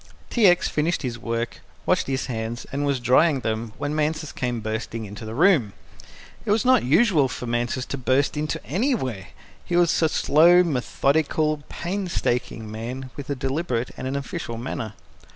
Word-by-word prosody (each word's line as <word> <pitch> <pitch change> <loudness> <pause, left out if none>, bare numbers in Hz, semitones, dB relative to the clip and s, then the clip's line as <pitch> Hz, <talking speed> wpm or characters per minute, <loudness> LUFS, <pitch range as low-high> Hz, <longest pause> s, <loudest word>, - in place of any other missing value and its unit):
T. 230 -4 +5
X. 175 0 +4
finished 160 +2 0
his 120 -2 -3
work, 115 0 -3 0.3
washed - - +2
his 135 -1 -1
hands, 115 -1 -4
and 145 +1 -1
was 140 -2 +1
drying 130 +4 +4
them 110 0 -2
when 145 +1 -2
Mansus 155 0 -1
came 120 -2 -2
bursting 110 +1 -4
into 105 +2 -8
the 110 +1 -6
room. 150 - +4 0.7
It - - -6
was 210 +2 +2
not 255 +1 +5
usual 155 - +4
for 125 - -6
Mansus 120 +2 -1
to 140 - -3
burst 130 +3 +1
into 150 +1 -2
anywhere. 145 - -1 0.4
He 175 - -2
was 175 -1 +3
a 160 - +4
slow, 170 +4 +5
methodical, 155 +1 +1
painstaking 170 - -2
man, 125 +4 -6
with 145 -1 -8
a 140 - 0
deliberate 130 -2 -2
and 130 - -5
an 135 - -2
official, 130 -4 -4
manner. 115 -3 -4
135 Hz, 170 wpm, -24 LUFS, 120-160 Hz, 0.7 s, T